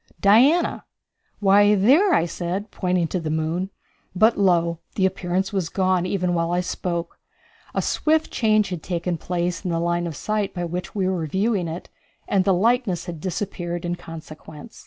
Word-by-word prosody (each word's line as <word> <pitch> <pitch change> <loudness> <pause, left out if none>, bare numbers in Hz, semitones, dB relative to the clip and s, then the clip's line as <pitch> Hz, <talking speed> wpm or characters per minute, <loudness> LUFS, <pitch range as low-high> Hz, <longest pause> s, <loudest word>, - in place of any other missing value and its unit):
"Diana." 260 +12 +4 0.5
"Why, 205 +1 +5
there," 275 - +4
I 165 - +3
said, 180 +4 -4
pointing 180 -2 0
to 185 - -1
the 160 -2 -4
moon. 160 +4 -1 0.5
But 220 +5 +4
lo! 170 -4 +2 0.2
the 190 - +2
appearance 190 +1 -1
was 185 -5 -1
gone 185 -2 +1
even 180 -2 0
while 165 0 0
I 175 - +1
spoke. 175 -1 -4 0.6
A - - +1
swift 315 0 +1
change 215 -3 +2
had 180 -3 -4
taken 175 0 -2
place 175 0 -2
in 185 - -2
the 165 -1 0
line 170 0 0
of 165 - -6
sight 210 +3 -2
by 175 -1 -2
which 175 +3 -5
we 190 -2 0
were 180 -4 -1
viewing 190 +2 0
it, 165 +2 -6 0.4
and 190 -2 +2
the 195 - +4
likeness 220 -2 +1
had 170 -2 -6
disappeared 175 -2 -4
in 175 0 -1
consequence. 160 +4 -11
180 Hz, 175 wpm, -23 LUFS, 170-200 Hz, 0.6 s, Why